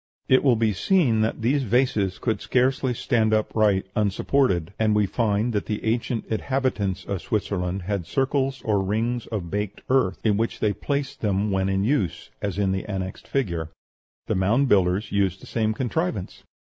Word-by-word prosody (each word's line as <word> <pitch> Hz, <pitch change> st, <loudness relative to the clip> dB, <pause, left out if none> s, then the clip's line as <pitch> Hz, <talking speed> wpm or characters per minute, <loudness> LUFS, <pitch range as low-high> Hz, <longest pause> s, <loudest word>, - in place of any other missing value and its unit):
It 130 Hz, -, +4 dB
will 130 Hz, -4 st, +5 dB
be 110 Hz, -1 st, +1 dB
seen 125 Hz, -, +2 dB
that 110 Hz, +1 st, -1 dB
these 135 Hz, +5 st, +2 dB
vases 110 Hz, -6 st, +1 dB
could 115 Hz, -3 st, -1 dB
scarcely 130 Hz, 0 st, +1 dB
stand 110 Hz, -2 st, +1 dB
upright 105 Hz, -3 st, +2 dB
unsupported; 100 Hz, -, +1 dB
and 110 Hz, -1 st, +3 dB
we 105 Hz, -1 st, +3 dB
find 110 Hz, +3 st, 0 dB
that 105 Hz, -, -1 dB
the 105 Hz, 0 st, -3 dB
ancient 115 Hz, 0 st, -1 dB
inhabitants 110 Hz, -5 st, -1 dB
of 100 Hz, -3 st, -3 dB
Switzerland 95 Hz, -3 st, -2 dB
had 95 Hz, -2 st, -3 dB
circles 135 Hz, 0 st, 0 dB
or 105 Hz, -3 st, +2 dB
rings 115 Hz, +5 st, -1 dB
of 95 Hz, -7 st, -4 dB
baked 105 Hz, 0 st, -3 dB
earth 130 Hz, -9 st, +2 dB
in 105 Hz, -2 st, +3 dB
which 115 Hz, +2 st, -1 dB
they 105 Hz, -1 st, +1 dB
placed 140 Hz, +6 st, -3 dB
them 100 Hz, 0 st, 0 dB
when 95 Hz, 0 st, +1 dB
in 95 Hz, 0 st, +1 dB
use, 100 Hz, -, -1 dB
as 100 Hz, -2 st, -2 dB
in 100 Hz, -2 st, +1 dB
the 95 Hz, 0 st, -2 dB
annexed 95 Hz, -2 st, -5 dB
figure. 85 Hz, -, -1 dB, 0.6 s
The -, -, -1 dB
Mound 110 Hz, +9 st, +2 dB
Builders 95 Hz, -1 st, +2 dB
used 95 Hz, -2 st, +1 dB
the -, -, -13 dB
same 110 Hz, -2 st, 0 dB
contrivance. 125 Hz, -, -2 dB
105 Hz, 170 wpm, -24 LUFS, 95-125 Hz, 0.6 s, will